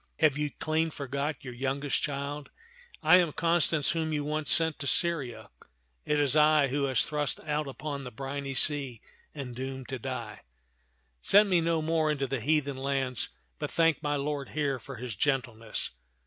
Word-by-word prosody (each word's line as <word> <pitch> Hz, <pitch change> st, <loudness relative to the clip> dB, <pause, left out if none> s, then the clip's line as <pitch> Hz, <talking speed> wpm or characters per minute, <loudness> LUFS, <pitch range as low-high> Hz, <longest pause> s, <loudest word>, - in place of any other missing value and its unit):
Have 155 Hz, -3 st, +4 dB
you 150 Hz, 0 st, -1 dB
clean 160 Hz, +2 st, -1 dB
forgot 140 Hz, 0 st, -4 dB
your 125 Hz, -2 st, -7 dB
youngest 135 Hz, +2 st, -1 dB
child? 145 Hz, 0 st, -4 dB, 0.5 s
I 160 Hz, +4 st, +8 dB
am 175 Hz, -4 st, +2 dB
Constance 165 Hz, -2 st, +2 dB
whom 160 Hz, -1 st, -1 dB
you 150 Hz, -1 st, -1 dB
once 150 Hz, 0 st, -1 dB
sent 160 Hz, -2 st, +5 dB
to 140 Hz, -, -3 dB
Syria. 150 Hz, -7 st, 0 dB, 0.5 s
It 150 Hz, 0 st, +1 dB
is 145 Hz, -1 st, +3 dB
I 150 Hz, -2 st, +5 dB
who 140 Hz, +3 st, -1 dB
was 130 Hz, -2 st, +2 dB
thrust 150 Hz, -1 st, -2 dB
out 150 Hz, -1 st, -2 dB
upon 140 Hz, +1 st, -5 dB
the 125 Hz, -, -6 dB
briny 135 Hz, +3 st, -5 dB
sea 135 Hz, -4 st, +1 dB, 0.4 s
and 130 Hz, -4 st, -6 dB
doomed 130 Hz, 0 st, -6 dB
to 130 Hz, -1 st, -4 dB
die. 120 Hz, -5 st, -5 dB, 0.8 s
Send 205 Hz, 0 st, +5 dB
me 175 Hz, -2 st, +4 dB
no 165 Hz, -1 st, +1 dB
more 160 Hz, -1 st, +1 dB
unto 140 Hz, -2 st, 0 dB
the 135 Hz, -2 st, -3 dB
heathen 145 Hz, 0 st, +1 dB
lands, 135 Hz, -2 st, 0 dB, 0.3 s
but -, -, -3 dB
thank 165 Hz, -2 st, +2 dB
my 145 Hz, -1 st, 0 dB
lord 140 Hz, -1 st, -3 dB
here 140 Hz, -4 st, -1 dB
for 135 Hz, +3 st, -9 dB
his 125 Hz, -2 st, -6 dB
gentleness." 120 Hz, -3 st, -1 dB
145 Hz, 175 wpm, -29 LUFS, 135-155 Hz, 0.8 s, I